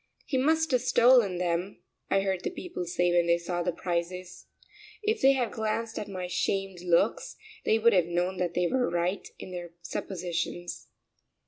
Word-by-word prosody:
"He 275 - -3
must 320 +3 +2
have 250 -2 +3
stolen 235 -7 +5
them," 175 +2 -1 0.3
I 195 - +3
heard 190 -2 -1
the - - -1
people 355 - -6
say 175 +1 +1
when 175 -1 +3
they 170 0 +4
saw 175 0 -3
the 180 +1 0
prices. 180 +1 -4 0.6
If 435 +1 0
they 270 +1 +7
had 245 -5 0
glanced 220 +1 -2
at 210 - -5
my 185 -2 -5
shamed 195 0 -1
looks, 175 -1 +1 0.3
they 220 - +4
would 230 +1 +4
have 180 -3 +3
known 175 +2 -1
that 175 -2 -1
they 180 0 +2
were 250 +7 +1
right 175 +3 -1
in 185 - -9
their 175 -1 -7
suppositions. 175 0 -4
180 Hz, 180 wpm, -28 LUFS, 175-220 Hz, 0.6 s, they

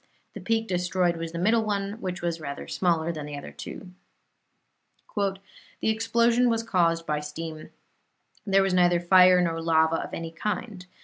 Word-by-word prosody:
The - - -7
peak 225 0 0
destroyed 180 -1 0
was 165 0 -5
the 170 - -6
middle 220 +6 +2
one, 205 0 -3
which 180 -2 -4
was 170 -1 -2
rather 140 -2 -6
smaller 170 -2 0
than 155 -3 -6
the 145 -1 -6
other 145 - -8
two. 185 - -9 1.2
"The 195 -2 -1 0.4
explosion 230 +2 +2
was 230 -1 0
caused 165 -5 +1
by 150 -1 -1
steam; 155 +1 -7 0.7
there 195 -1 +3
was 195 -1 0
neither 175 -1 +4
fire 180 +1 +6
nor 165 -2 -1
lava 160 0 +3
of - - -5
any 165 -1 -6
kind. 190 +1 -4
180 Hz, 165 wpm, -26 LUFS, 165-205 Hz, 1.2 s, fire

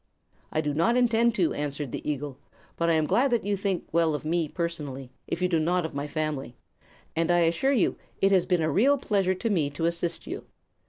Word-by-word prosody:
"I 155 - +1
do 150 -1 -1
not 230 +11 +2
intend 235 -1 +3
to," 320 - +2
answered 145 -2 -3
the - - -4
eagle. 145 -2 -5 0.4
"But 170 0 0
I - - +4
am 160 -1 +2
glad 255 - +3
that 235 -2 +1
you 205 0 +1
think 195 -2 -2
well 165 -2 +2
of 150 - -6
me 165 0 +1
personally, 145 -6 -4 0.2
if 180 - -2
you - - +4
do 170 -3 +1
not 175 +2 +1
of 160 - -5
my 140 +1 -3
family, 150 -5 -3 0.6
and 165 +1 +1
I 175 0 +4
assure 170 +11 +2
you 250 -8 +2 0.2
it 195 - +3
has 185 -3 +3
been 180 -3 +2
a 155 - +1
real 265 - +4
pleasure 195 -7 +1
to 225 +5 -2
me 160 -7 +1
to 145 +3 -3
assist 170 0 -2
you. - - -6
170 Hz, 225 wpm, -27 LUFS, 150-195 Hz, 0.6 s, I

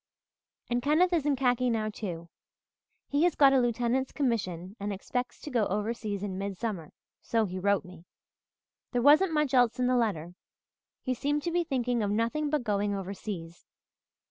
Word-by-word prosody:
"And 240 0 0
Kenneth 320 +7 +3
is 310 -4 +1
in 290 - +3
khaki 250 -1 +2
now, 215 -2 -1
too. 175 -6 -6 0.8
He 285 +1 0
has 355 - +2
got 275 -2 +6
a 265 - +5
lieutenant's 245 +2 0
commission 195 - -2
and 205 +1 -3
expects 245 +6 -4
to 295 - -7
go 230 -5 +2
overseas 210 0 -2
in 190 -2 -4
midsummer, 195 -4 -4 0.3
so 225 -1 +1
he 185 -1 -5
wrote 200 0 +1
me. 180 -2 -13 0.9
There 245 -1 +1
wasn't 310 +6 +6
much 300 -4 +1
else 245 -1 +4
in 250 - +1
the 250 0 +2
letter 180 -8 -1 0.7
he 255 - 0
seemed 290 +4 -1
to 345 - -1
be 350 +1 +1
thinking 245 -6 -1
of 205 - 0
nothing 230 +8 0
but 295 -3 0
going 205 -2 0
overseas. 190 -3 -6
235 Hz, 170 wpm, -29 LUFS, 200-270 Hz, 0.9 s, got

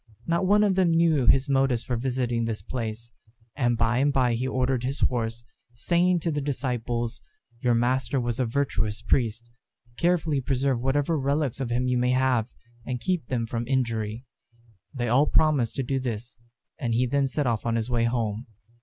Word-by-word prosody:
Not 170 +2 +1
one 210 +2 +5
of 200 -2 +3
them 185 -2 +3
knew 165 -5 +3
his 135 +1 +5
motives 135 -3 +2
for 125 - -2
visiting 120 -1 -1
this 115 -2 -4
place; 115 -1 -5 0.4
and 120 -3 +1
by 115 +1 +2
and 145 +2 +3
by 130 -3 +2
he 125 +3 -1
ordered 130 -1 0
his 135 +2 -3
horse, 115 -1 0 0.3
saying 175 +7 +2
to 165 - -1
the 145 -1 -2
disciples, 120 -3 -2 0.4
"Your 120 0 +2
master 130 +3 +1
was 120 -1 -2
a 130 - +2
virtuous 115 -4 -1
priest. 120 -1 0 0.5
Carefully 165 -5 +1
preserve 130 -1 0
whatever 145 +4 +1
relics 140 -1 -1
of 130 -3 -2
him 125 +1 0
you 125 -1 +1
may 125 0 +1
have, 130 -3 +1 0.3
and 125 +1 -4
keep 180 -4 -1
them 120 -3 -1
from 115 0 -4
injury." 115 -3 -1 0.7
They 120 -4 -3
all 135 +6 +3
promised 145 -7 +2
to 135 - -1
do 135 +2 -1
this, 120 -2 -5 0.4
and 115 -2 -1
he 125 +2 +2
then 140 +2 +1
set 145 +2 -1
off 115 -3 0
on 115 -1 0
his 115 +1 -2
way 115 -1 +2
home. 115 -1 -2
125 Hz, 185 wpm, -26 LUFS, 115-140 Hz, 0.7 s, one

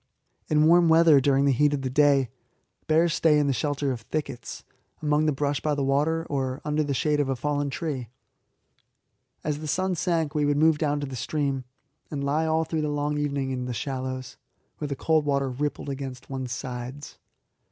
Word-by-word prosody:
In 155 0 +3
warm 170 +1 +6
weather, 160 -3 +6
during 140 0 +3
the 140 - +4
heat 145 +3 +3
of 135 - -5
the 130 - -1
day, 140 -3 +3 0.6
bears 160 +1 +3
stay 155 -1 +4
in 145 - +3
the 140 - +2
shelter 145 +2 -1
of 120 -3 -4
thickets, 125 +1 -5 0.4
among 150 0 +1
the - - +3
brush 145 0 -1
by 150 -1 0
the 140 - -1
water 150 +4 +1
or 135 -1 -2
under 150 0 +1
the 140 -2 -2
shade 150 +1 +1
of 145 -2 +1
a 135 - 0
fallen 145 +2 -1
tree. 135 -6 -4 1.3
As 150 -1 -2
the 155 - -6
sun 185 +4 0
sank 165 -3 0
we 150 -2 +1
would 145 0 +2
move 155 0 +4
down 145 -2 0
to - - -2
the 135 -1 -7
stream, 135 +1 -2 0.4
and 140 -2 -4
lie 150 +3 +1
all 160 0 +2
through 160 0 -2
the 150 - -1
long 145 0 -1
evening 140 -2 -1
in 125 -1 -3
the 125 - -3
shallows, 130 +1 -4 0.4
where 150 - -3
the 140 - -3
cold 155 +2 +2
water 140 -2 0
rippled 145 +2 -3
against 135 -1 -6
one's 130 -2 -4
sides. 125 +2 -6
145 Hz, 200 wpm, -26 LUFS, 135-155 Hz, 1.3 s, warm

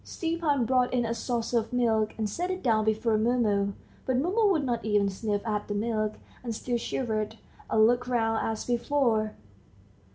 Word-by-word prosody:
Stepan 325 -6 -1
brought 250 +1 +2
in 245 -2 +1
a 230 - -1
saucer 235 0 -1
of 225 - -6
milk, 225 -3 +1
and 220 -1 -1
set 350 - -3
it 370 0 -3
down 220 -4 +2
before 220 0 +1
Mumu, 215 -4 +1 0.3
but 260 -1 +2
Mumu 395 - +2
would 315 -6 +1
not 240 -3 -1
even 205 -2 +2
sniff 205 +1 -2
at 210 -2 -2
the 205 - -3
milk, 215 0 -1 0.3
and 230 -3 -3
still 240 +2 -2
shivered, 220 -4 -2 0.3
and 220 0 +5
looked 245 +2 +2
round 225 -2 +1
as 220 -1 -2
before. 240 -3 +1
230 Hz, 175 wpm, -28 LUFS, 215-250 Hz, 0.3 s, and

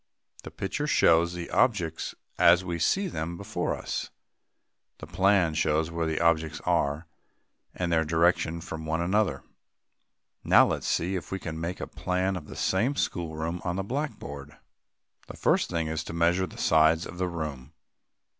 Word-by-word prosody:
"] - - -23
The - - -6
picture 100 +10 -3
shows 85 - +4
the 90 -1 -6
objects 90 -10 +1 0.2
as 85 +2 +6
we 85 -1 -3
see 195 - +2
them 85 - -4
before 100 -2 -2
us. - - -4 0.9
The - - -9
plan 95 -4 +2
shows 80 +1 +1
where 85 -1 -1
the 80 - -1
objects 80 -2 +1
are, 75 +4 0 0.7
and 85 -1 -2
their 80 -1 +3
direction 85 +1 +1
from 80 -1 -7
one 80 +1 0
another. 90 -5 +1 1.0
Now - - +6
let - - -1
us - - -6
see 90 +3 0
if 90 - -5
we 95 - -1
can 80 -3 -6
make 85 +2 -4
a - - -3
plan 90 +1 -1
of 80 -5 -7
the - - -9
same 120 +9 +1
schoolroom 85 - -2
on 90 -1 -2
the 95 - -2
blackboard. 95 - -5 0.7
The - - -10
first - - +2
thing 85 -2 -1
is 80 0 -2
to - - -7
measure 85 +3 +2
the - - -13
sides 80 +1 +3
of 85 - -9
the 90 - 0
room. 75 -5 -6
85 Hz, 175 wpm, -27 LUFS, 80-90 Hz, 1.0 s, as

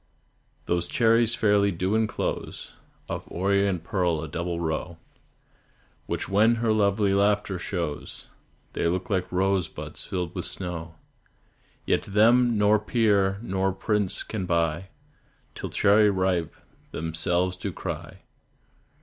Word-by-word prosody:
Those 85 0 0
cherries 115 +1 +3
fairly 105 -2 +3
do 95 +2 -1
enclose 110 -1 -2 0.3
Of - - -4
orient 100 -1 0
pearl 85 -4 0
a - - -5
double 85 +3 -3
row, 80 +1 -3 1.1
Which - - -3
when 110 +4 +4
her 115 -1 +1
lovely 100 -1 +2
laughter 100 -1 +1
shows, 85 -5 -4 0.5
They - - 0
look 90 +5 -2
like 95 -1 -1
rose 95 0 +1
buds - - -8
filled 90 -2 -4
with 90 - -4
snow; 85 -3 -5 0.9
Yet - - +2
them 115 +3 +4
nor 105 +1 +4
peer 100 -3 +2
nor 95 -2 0
prince 105 0 -1
can 95 -5 -4
buy, 85 +1 0 0.7
Till - - -6
"Cherry 105 +1 +4
ripe" 95 -4 0 0.4
themselves 85 +3 -1
do 90 - -4
cry. - - -6
95 Hz, 125 wpm, -26 LUFS, 85-105 Hz, 1.1 s, when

